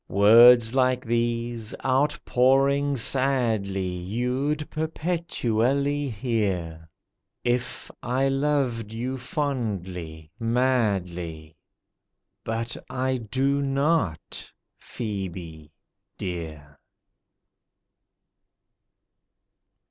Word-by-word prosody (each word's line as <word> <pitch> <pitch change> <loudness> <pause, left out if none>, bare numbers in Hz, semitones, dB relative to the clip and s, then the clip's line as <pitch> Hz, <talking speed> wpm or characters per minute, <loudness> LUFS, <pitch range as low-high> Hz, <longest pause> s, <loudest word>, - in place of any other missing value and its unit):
Words 115 +4 +7
like 130 -1 +2
these, 115 -1 -1
outpouring 140 0 +2
sadly 115 -7 +1
You'd 125 - -2
perpetually 145 -4 -1
hear, 95 -9 -2 0.5
If 125 +1 -2
I 130 +3 0
loved 135 -5 0
you 130 +3 -3
fondly, 95 - -4
madly;— 95 -10 -1 0.9
But 115 +1 -3
I 130 0 -1
do 135 +5 0
not, 135 - -1 0.3
PHŒBE 90 -8 -6 0.5
dear. 80 -5 -6
120 Hz, 60 wpm, -25 LUFS, 95-135 Hz, 0.9 s, Words